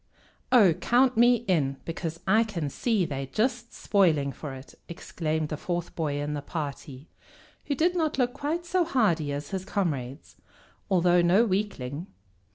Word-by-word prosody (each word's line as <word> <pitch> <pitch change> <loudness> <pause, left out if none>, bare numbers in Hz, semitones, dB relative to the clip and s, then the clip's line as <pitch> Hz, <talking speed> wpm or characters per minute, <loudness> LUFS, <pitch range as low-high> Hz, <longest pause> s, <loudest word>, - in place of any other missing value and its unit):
"Oh, 210 -9 +6
count 250 +8 +2
me 240 0 +4
in, 140 -7 +1
because 165 0 -5
I 220 +4 +4
can 170 -10 -4
see 220 - 0
they're 135 -3 -4
just 235 - -1
spoiling 160 -9 +2
for 135 +1 -7
it!" 130 +1 -12 0.2
exclaimed 160 -2 -3
the 150 - -3
fourth 175 +1 -4
boy 145 -3 -2
in 145 +1 -3
the 145 - -3
party, 140 -2 -6 0.6
who 285 - -1
did 345 +6 +1
not 315 -5 0
look 245 -2 +1
quite 300 +5 -3
so 360 +1 +1
hardy 200 - +1
as 145 0 -5
his 190 -1 -3
comrades, 145 - -3 0.5
although 180 -2 +4
no 185 +7 +4
weakling. 185 - -3
175 Hz, 160 wpm, -27 LUFS, 150-235 Hz, 0.6 s, Oh